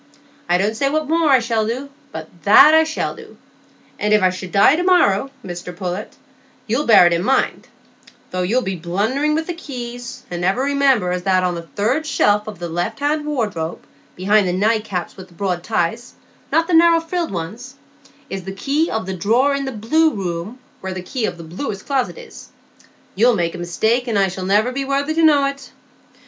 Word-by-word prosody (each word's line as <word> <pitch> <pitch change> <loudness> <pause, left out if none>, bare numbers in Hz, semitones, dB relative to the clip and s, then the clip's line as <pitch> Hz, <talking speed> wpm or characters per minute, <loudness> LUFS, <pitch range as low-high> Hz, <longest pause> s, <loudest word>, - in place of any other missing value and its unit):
I 175 - +4
don't 205 +4 0
say 275 +5 0
what 310 +1 -1
more 325 0 +2
I 270 - +7
shall 230 -2 -1
do; 260 +5 -4 0.2
but 160 0 -7
that 275 +9 +7
I 320 0 +5
shall 315 - -3
do, - - -14 0.6
and 210 +1 +3
if 210 - +2
I 185 - +4
should 185 0 -8
die 200 - +5
to 340 - -1
morrow, 310 - +3 0.2
Mr 175 -1 -7
Pullet, 185 +3 -5 0.5
you'll 245 +6 -1
bear 220 -6 +7
it 175 - +4
in 170 +1 0
mind,—though 195 -5 -4
you'll 230 +8 +1
be 190 -2 -3
blundering 215 - -1
with 320 +1 -1
the 350 - -4
keys, 245 -6 -8
and 175 0 -4
never 190 +9 +1
remember 275 -9 +2
as 180 0 -2
that 185 0 +2
on 180 -1 0
the 170 - -5
third 255 +10 0
shelf 210 -7 +2
o' 215 - -5
the 175 -3 -6
left 175 +8 -3
hand 295 +1 -1
wardrobe, 210 - -3 0.3
behind 200 +2 +2
the 180 - 0
night 215 +3 +1
caps 180 -5 -4
with 185 -1 -11
the 175 - -21
broad 180 -2 -2
ties,—not 230 - -2
the 355 - -3
narrow 335 0 +6
frilled 335 +1 -3
uns,—is 260 - -9
the 190 - -6
key 285 - 0
of 220 -3 -2
the 190 - -4
drawer 230 +10 +2
in 280 0 -2
the 265 - -3
Blue 310 +9 +2
Room, 180 +3 -4 0.2
where 190 0 -5
the 185 - -6
key 235 +3 -2
o' - - -2
the 170 - -11
Blue 185 - -5
Closet 260 - -2
is. 485 -1 -12 0.6
You'll 235 +4 +3
make 170 -3 -1
a 180 - -7
mistake, 220 +8 0
and 225 -3 0
I 195 -1 +3
shall 185 0 -6
niver 210 +5 +2
be 275 +2 -3
worthy 280 +3 -1
to 330 - +1
know 295 -3 +5
it. 275 0 -5
220 Hz, 205 wpm, -19 LUFS, 185-280 Hz, 0.6 s, I